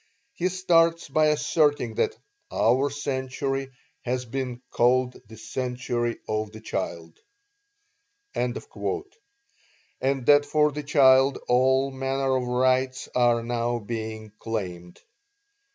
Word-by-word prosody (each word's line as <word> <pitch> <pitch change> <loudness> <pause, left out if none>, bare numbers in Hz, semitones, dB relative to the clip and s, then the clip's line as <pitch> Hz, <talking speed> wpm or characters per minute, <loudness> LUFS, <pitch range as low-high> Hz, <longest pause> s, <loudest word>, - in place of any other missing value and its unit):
He 185 -6 0
starts 170 -2 +2
by 155 +2 +3
asserting 150 -5 +2
that - - 0 0.3
"our 130 +5 +2
century 135 -1 -3 0.3
has 125 +1 -2
been 125 0 -4
called 125 +1 +2
the 110 +1 -12
century 120 +1 -3
of 110 0 -2
the 110 - -10
child," 85 -6 -5 1.1
and - - -1
that 390 - -2
for 150 0 +3
the 150 +1 -5
child 135 -2 +5
all 130 +2 +3
manner 135 0 -1
of 125 -1 -1
rights 130 +1 +1
are 120 -2 +3
now 120 0 -1
being 110 -1 -6
claimed. 90 -6 -5
130 Hz, 105 wpm, -25 LUFS, 120-140 Hz, 1.1 s, child